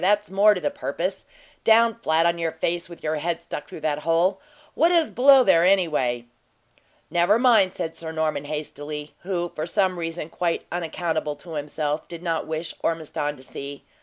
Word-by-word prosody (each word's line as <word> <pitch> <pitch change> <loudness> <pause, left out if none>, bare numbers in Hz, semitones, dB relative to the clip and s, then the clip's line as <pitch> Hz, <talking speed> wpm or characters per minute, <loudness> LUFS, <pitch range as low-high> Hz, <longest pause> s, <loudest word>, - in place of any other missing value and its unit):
that's 205 +1 +2
more 205 +2 +5
to 180 - -4
the 290 - 0
purpose. 285 +2 -3 0.4
Down 230 +1 +5
flat 165 -8 +1
on 170 0 +2
your 165 -1 -1
face, 170 +2 -2
with 170 - -12
your 155 0 -1
head 170 +2 -2
stuck 150 - -6
through - - -9
that 150 -1 0
hole. 170 +5 +1 0.3
What 335 +2 +3
is 335 -3 +3
below 270 +1 +7
there, 165 -7 +5
anyway?" 155 -11 +2 0.9
"Never 175 +5 +4
mind," 225 -7 +4
said 160 - -3
Sir 160 -1 -7
Norman, 155 -2 -1
hastily, 150 0 -5
who, 175 -2 -3
for 155 +1 -4
some 185 -1 +1
reason 165 -1 -4
quite 170 0 -2
unaccountable 165 -3 -2
to 165 +4 -12
himself, 150 0 -3
did 170 0 -9
not 165 -2 -1
wish 160 +1 -4
Ormiston 150 -2 -2
to 130 - -13
see. 140 +2 -8
170 Hz, 180 wpm, -24 LUFS, 155-190 Hz, 0.9 s, below